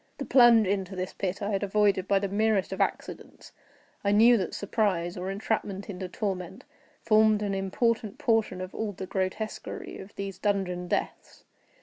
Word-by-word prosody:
The 275 - -5
plunge 240 -3 +6
into 195 0 -2
this 185 0 -4
pit 190 0 -3
I 205 - -1
had 195 - 0
avoided 200 -2 +2
by 200 - +3
the 200 +1 0
merest 205 0 +1
of - - -3
accidents, - - -4 0.5
I 200 - +2
knew 230 +4 +6
that 185 -5 -3
surprise, 190 -5 -1
or 185 +1 -4
entrapment 200 0 -3
into 185 -1 -6
torment, 190 +3 -4 0.4
formed 215 -1 +4
an 200 -1 -1
important 205 +3 -1
portion 225 -7 +1
of 185 0 -7
all 215 -2 -3
the 190 0 -6
grotesquerie 190 +3 -4
of 190 +1 -11
these 195 -2 -6
dungeon 185 -4 -1
deaths. - - -4
200 Hz, 165 wpm, -27 LUFS, 190-215 Hz, 0.5 s, plunge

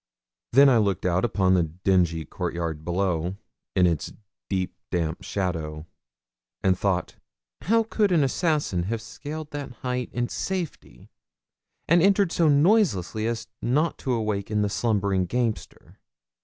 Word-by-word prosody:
Then 140 +3 +7
I 125 -4 +5
looked 100 -4 0
out 90 0 +2
upon 95 -5 +2
the 90 - +4
dingy 85 0 +1
courtyard 85 -2 -4
below, 90 0 -1 0.4
in 90 - +5
its 85 -4 0 0.4
deep 95 -2 -1 0.2
damp 80 -2 -2
shadow, 80 -5 -3 0.8
and 95 -1 +4
thought, 95 -1 -1 0.4
'How 225 +3 +3
could 215 -2 +1
an 165 -5 +4
assassin 145 - 0
have 115 0 -1
scaled 150 +6 -7
that 145 -3 -5
height 125 -1 -2
in 120 0 -1
safety, 185 +1 -5 0.8
and 170 +1 +5
entered 195 -1 +4
so 165 -3 +3
noiselessly 145 - +3
as 115 -1 -3
not 150 +7 +1
to 130 - -1
awaken 105 -2 -1
the 105 - 0
slumbering 100 -4 0
gamester?' 115 +2 -3
105 Hz, 135 wpm, -25 LUFS, 90-145 Hz, 0.8 s, Then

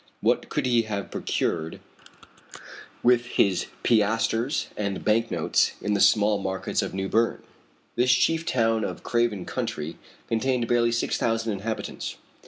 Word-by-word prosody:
What - - +1
could - - -1
he 120 -2 +3
have 100 -2 -4
procured 80 -1 -2 1.2
with 120 0 +4
his 95 -2 +2 0.2
piastres 115 +4 +1
and 100 -2 -3
bank 115 +2 +2
notes - - +1
in 105 - -1
the 100 - +1
small 105 -1 +4
markets 95 -1 -2
of - - -4
New 95 0 -2
Berne? 115 +3 +1 0.5
This 125 +1 +3
chief 165 +6 +3
town 115 -8 +1
of - - -5
Craven 120 -6 0
County 75 +2 -4 0.3
contained 120 +1 0
barely 120 0 +2
six 115 - -1
thousand 115 -1 0
inhabitants. 110 +3 -4
115 Hz, 140 wpm, -25 LUFS, 100-120 Hz, 1.2 s, with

